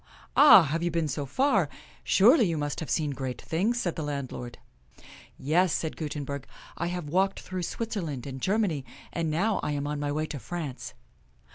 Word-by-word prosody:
"Ah, 285 - +9
have 160 +2 -1
you 175 - +1
been 165 -1 0
so 145 0 -3
far.? 205 - +2 0.3
Surely, 225 - +5
you 165 -2 -1
must 145 -1 -2
have 160 - -5
seen 150 +3 0
great 130 -2 -4
things," 210 +9 0
said 175 -7 -1
the - - -4
landlord. 140 -4 -5 0.5
" - - -16 0.2
Yes," 165 +4 +2
said 160 - -2
Gutenberg; 145 -3 -5 0.2
" - - -17
I 170 - -2
have 175 -2 -3
walked 190 +5 +1
through 185 0 -5
Switzerland 170 - -4
and 135 -1 -7
Germany, 190 - +1 0.3
and 165 -2 -1
now 195 +7 +1
I 150 - -2
am 145 0 -2
on 145 0 -2
my 145 0 -1
way 155 +2 -1
to 150 -2 -6
France." 150 -4 -6
160 Hz, 190 wpm, -28 LUFS, 145-185 Hz, 0.5 s, Ah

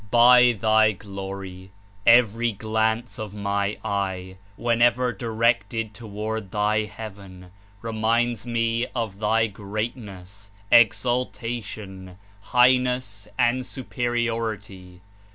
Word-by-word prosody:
"By 125 +1 +7
Thy 110 0 +3
Glory, 95 -1 -8 0.4
every 115 0 +4
glance 110 +4 -1
of 105 -2 -6
my 100 0 -1
eye, 95 -2 -3 0.2
whenever 120 +1 +2
directed 115 0 -1
toward 110 -1 -5
Thy 105 +1 +1
heaven, 100 -4 -10 0.3
reminds 115 0 0
me 115 0 -1
of 110 -5 -3
Thy 110 +1 +2
greatness, 100 -2 -6 0.2
exaltation, 115 -5 0 0.2
highness 125 -3 +2
and 125 +1 +2
superiority. 115 -8 -4
110 Hz, 85 wpm, -24 LUFS, 100-120 Hz, 0.4 s, By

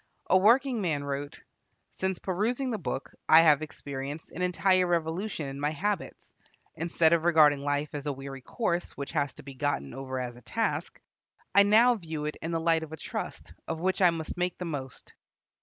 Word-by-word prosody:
A - - +6
working 235 +5 +4
man 155 -6 -1
wrote: 140 0 -5 0.5
"Since 190 -1 -2
perusing 235 +8 -1
the 220 - -2
book 140 -5 -4 0.2
I 160 +1 +9
have 155 -3 +5
experienced 145 0 -6
an - - -6
entire 180 0 +3
revolution 170 +1 -1
in 135 0 -6
my 145 +1 +1
habits. 190 +5 -3 0.4
Instead 165 0 +2
of 165 -1 +2
regarding 155 -4 +5
life 145 +1 -1
as 145 0 -5
a - - +1
weary 135 0 -7
course, 180 - -2
which 140 - -5
has 140 -1 -1
to - - -12
be 135 0 -9
gotten 135 - -2
over 130 -1 -5
as 125 -1 -4
a 120 - -14
task, - - -2 0.5
I 200 - +8
now 220 +5 +6
view 160 -8 -5
it 150 - -4
in 165 - -4
the 165 -1 0
light 165 0 +2
of 160 -1 -8
a 160 - -6
trust, - - -6
of 160 - -3
which 185 +3 0
I 180 - +7
must 165 -1 -4
make 180 0 -1
the 180 - -5
most." 140 -6 -6
160 Hz, 195 wpm, -28 LUFS, 145-185 Hz, 0.5 s, I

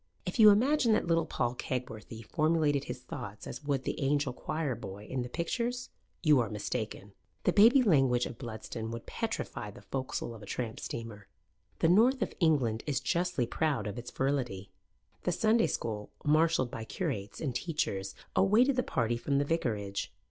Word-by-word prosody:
If 180 +6 -4
you 215 -1 +10
imagine 240 +3 +4
that - - +2
little 165 -1 +2
Paul 120 0 -1
Kegworthy 115 -3 -5
formulated 155 -2 +2
his 125 - -6
thoughts 120 -5 -7
as - - -7
would 140 -2 0
the - - -3
angel 145 -1 +1
choir 155 +1 -2
boy 105 -3 -8
in 130 +3 -3
the 125 - -4
pictures, 235 - -2 0.3
you 150 -5 +6
are 115 -3 0
mistaken. 105 -1 -4 0.3
The - - +3
baby 235 +6 +7
language 135 - +4
of 120 - -7
Bludston 110 -2 -6
would 115 0 -6
petrify - - -4
the - - -13
foc'sle 130 -3 -3
of 110 - -11
a 105 - -11
tramp, 115 0 -3
steamer. 115 -4 -6 0.5
The 165 - +5
North 240 +8 +5
of - - -4
England 135 - +2
is 140 -4 +1
justly 175 -2 0
proud 135 -2 0
of 105 +3 -4
its 120 - -7
virility. 125 -8 -2 0.5
The 180 - 0
Sunday 220 +5 +3
school, 105 -2 -3 0.2
marshalled 155 -4 +3
by 110 - -5
curates 100 -2 -4
and 140 -6 -2
teachers, 100 - -2 0.2
awaited 225 +8 +4
the - - +4
party 120 - 0
from 140 +3 0
the 140 - +2
vicarage. 105 -11 -1
135 Hz, 175 wpm, -31 LUFS, 115-165 Hz, 0.5 s, you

